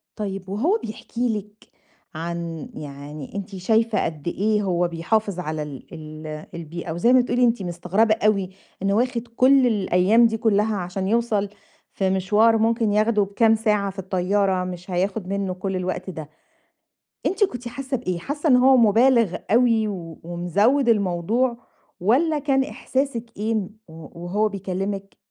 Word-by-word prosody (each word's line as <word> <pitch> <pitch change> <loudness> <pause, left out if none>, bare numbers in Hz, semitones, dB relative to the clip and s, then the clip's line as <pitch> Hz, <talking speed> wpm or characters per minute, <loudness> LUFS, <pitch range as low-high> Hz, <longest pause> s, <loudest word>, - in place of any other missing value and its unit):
طيب 195 -3 -5
وهو 300 - +1
بيحكي 230 +1 -3
لِك 210 +1 -12 0.5
عن 170 -1 -5
يعني 145 +1 -9
أنتِ 200 0 -5
شايفة 220 +4 +1
قد 155 -1 -5
إيه 210 +4 +1
هو 175 -2 +1
بيحافظ 180 +3 -1
على 155 -2 -3
ال 140 -3 -9
ال 155 -1 -8
البيئة 170 0 -6
وزي 175 +10 +3
ما 255 - +7
بتقولي 245 0 0
أنتِ 235 -3 +2
مستغربة 180 +5 +1
أوي 210 -3 +1 0.3
إنّه 195 0 +1
واخِد 240 +1 0
كلّ 260 0 +5
الأيام 205 +1 +3
دي 225 0 -2
كلّها 215 -1 +2
عشان 185 +1 -3
يوصَل 215 -2 +1 0.4
في 190 -1 0
مشوار 210 +4 +3
ممكن 225 -1 +1
ياخده 215 0 +3
بكام 220 +3 +3
ساعة 210 -3 +1
في 195 - -10
الطيارة 190 0 0
مش 180 0 -7
هياخد 190 +2 -1
منُّه 195 -1 -2
كلّ 190 +1 -4
الوقت 185 0 -3
ده، 155 -4 -7 1.0
أنتِ 400 +3 +2
كنتِ 245 - -2
حاسّة 265 +2 -3
بإيه؟ 185 -7 -3
حاسّة 290 - -2
إن 255 - +7
هو 260 +1 +6
مُبالِغ 230 -3 +4 0.2
أوي 230 -2 +4
و 170 -6 -7
ومزوّد 200 - +1
الموضوع 215 +4 +1 0.4
والّا 290 - +2
كان 270 -2 +2
إحساسِك 265 -3 -2
إيه 215 +2 -1
ن 210 -4 -1 0.2
و 165 +1 -11
وهو 205 +5 0
بيكلّمِك 195 0 -4
200 Hz, 150 wpm, -23 LUFS, 180-230 Hz, 1.0 s, ما